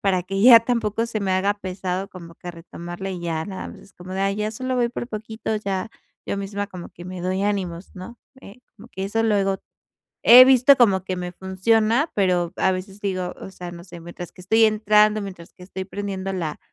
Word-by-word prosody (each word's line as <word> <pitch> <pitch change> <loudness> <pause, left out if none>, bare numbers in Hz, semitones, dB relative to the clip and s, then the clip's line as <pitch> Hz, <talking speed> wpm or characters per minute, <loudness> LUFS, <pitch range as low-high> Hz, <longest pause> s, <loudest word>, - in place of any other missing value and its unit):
para 185 -3 +1
que 195 +1 -2
ya 240 0 +10
tampoco 230 -1 -1
se 220 -2 -3
me 195 -1 -1
haga 190 +2 +2
pesado 190 -1 -4
como 170 -2 -12
que 175 - -8
retomarla 175 +2 -8
y 180 -2 -5
ya 165 -2 -2
nada 190 0 -7
más - - -11
es 195 - -18
como 180 +1 -10
de: 190 - -2
"Ay, 195 0 +1
ya 210 +1 -2
solo 255 +4 -3
voy 245 -1 +1
por 235 0 -5
poquito", 220 -1 -5
ya 200 0 -3 0.4
yo - - -2
misma 200 +1 -4
como 185 -3 -9
que 175 - -13
me 185 0 -7
doy 185 +2 -1
ánimos, 190 -3 -3
¿no? 195 +6 -10 0.2
Eh, 200 -3 -13 0.2
como 225 +4 -15
que 190 -5 -5
eso 225 +3 0
luego 200 -3 +1 0.6
he 250 +2 +10
visto 265 +1 +6
como 195 -6 +4
que 185 -1 -3
me 180 0 -5
funciona, 220 - +1
pero 180 -4 +1
a 190 - +2
veces 190 +2 -6
digo, 185 -3 -3
o - - -9
sea, 180 -2 -8
no 170 0 -11
sé, 175 -2 -11
mientras 175 +1 -9
que - - -15
estoy 220 +5 +3
entrando, 215 0 +3
mientras 185 -4 -9
que 180 - -17
estoy 190 0 -6
prendiendo 195 -1 -5
la 165 -5 -3
195 Hz, 220 wpm, -23 LUFS, 185-215 Hz, 0.6 s, ya